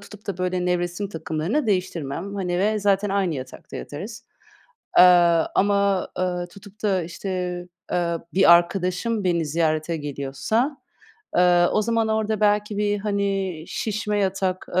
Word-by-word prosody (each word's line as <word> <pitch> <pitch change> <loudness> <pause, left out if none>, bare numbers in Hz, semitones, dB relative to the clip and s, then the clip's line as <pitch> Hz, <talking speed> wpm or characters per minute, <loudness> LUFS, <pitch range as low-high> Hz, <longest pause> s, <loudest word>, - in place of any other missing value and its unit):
tutup 210 +1 -14
da 190 -3 -4
böyle 180 0 -1
nevresim 180 +2 -1
takımlarını 165 - -2
değiştirmem, 180 -2 -2
hani, 180 -2 -1
ve 215 +2 +1
zaten 200 0 +2
aynı 195 -5 0
yatakta 130 -1 -8
yatarız. 205 +10 -7 0.7
Aaa, 175 -2 +6
ama, 200 -1 +2
ııı, 180 -1 -1
tutup 200 +2 -15
da, 195 -4 +1
işte, 175 +4 -7 0.6
eee, 170 -1 0 0.2
bir 185 -2 +7
arkadaşım 185 +5 +1
beni 170 -3 +1
ziyarete 155 +1 0
geliyorsa, 145 - -2 0.6
eee, 175 -1 +5
o 215 - +2
zaman 225 0 +1
orada 220 -1 0
belki 210 0 +2
bir, 205 0 +1
hani, 195 -5 -2
şişme 210 -1 -2
yatak, 190 -1 -1
eee, - - +5
190 Hz, 140 wpm, -23 LUFS, 175-205 Hz, 0.7 s, bir